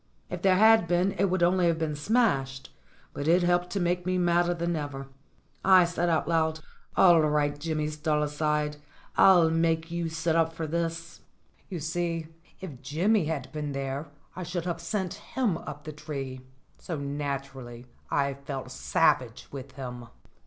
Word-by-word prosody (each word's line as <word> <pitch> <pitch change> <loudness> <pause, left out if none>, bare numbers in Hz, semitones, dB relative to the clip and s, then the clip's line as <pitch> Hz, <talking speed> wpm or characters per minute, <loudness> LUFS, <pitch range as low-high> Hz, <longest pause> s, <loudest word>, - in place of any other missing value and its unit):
If 180 -1 -4
there 190 -1 +4
had 220 -1 +6
been 175 +3 +2
it 200 - +4
would 185 -2 +1
only 180 0 +3
have 165 -1 +2
been 160 -2 -2
smashed; 140 - 0 0.4
but 145 - -4
it 175 +2 +4
helped 175 0 +2
to 200 - -2
make 175 0 0
me 185 +1 0
madder 175 0 +2
than 170 0 -1
ever. 140 -3 -5 0.5
I 185 -2 +7
said 175 0 -1
out 165 - +1
loud: 160 -1 +1 0.4
"All 175 -3 +7
right, 150 -1 +1
Jimmy 155 -1 -2
Stalside, 150 0 -1 0.4
I'll 175 -4 +6
make 165 0 +1
you 170 -1 -2
sit 160 +1 -1
up 165 0 +2
for 165 0 -4
this." 165 +1 -3 0.5
You 180 -4 -4
see, 165 0 -2 0.3
if 150 -9 -8
Jimmy 170 +8 +1
had 150 -4 -3
been 150 -2 -4
there 135 +2 -3 0.3
I 185 - -6
should 175 -1 -4
have 170 -2 -3
sent 185 +1 -2 0.2
him 235 -9 +2
up 145 -1 -8
the 155 - -6
tree; 140 -4 -6 0.4
so 165 - -5
naturally 140 -4 -5 0.2
I 140 -1 +1
felt 135 -2 -7
savage 130 -4 +1
with 135 -1 -8
him. 125 -3 -7
160 Hz, 165 wpm, -28 LUFS, 145-175 Hz, 0.5 s, I